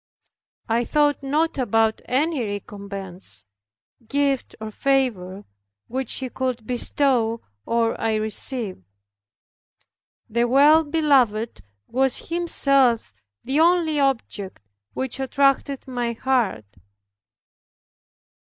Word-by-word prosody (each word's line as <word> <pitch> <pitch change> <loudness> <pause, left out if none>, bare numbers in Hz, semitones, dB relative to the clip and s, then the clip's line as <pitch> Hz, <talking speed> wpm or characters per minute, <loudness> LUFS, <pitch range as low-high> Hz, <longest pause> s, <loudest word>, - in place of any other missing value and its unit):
I 230 +1 +1
thought 290 +2 +1
not 295 +2 0
about 225 -2 +1
any 285 +1 0
recompense, 200 - -7 0.6
gift, 280 0 0
or 220 0 -6
favor, 210 -8 -1 0.4
which 260 0 -3
He 260 -1 -2
could 255 -3 -3
bestow 240 -1 +1 0.3
or 230 -1 0
I 225 -1 +1
receive. 215 - -2 1.4
The 235 +2 +1
Well 290 +6 +6
beloved 270 - +1 0.2
was 265 +4 0
Himself 275 - +2 0.3
the 270 +4 0
only 330 -2 +3
object 225 - -2 0.3
which 265 0 -3
attracted 275 0 +1
my 245 -2 -2
heart. 230 - 0
250 Hz, 90 wpm, -23 LUFS, 220-275 Hz, 1.4 s, Well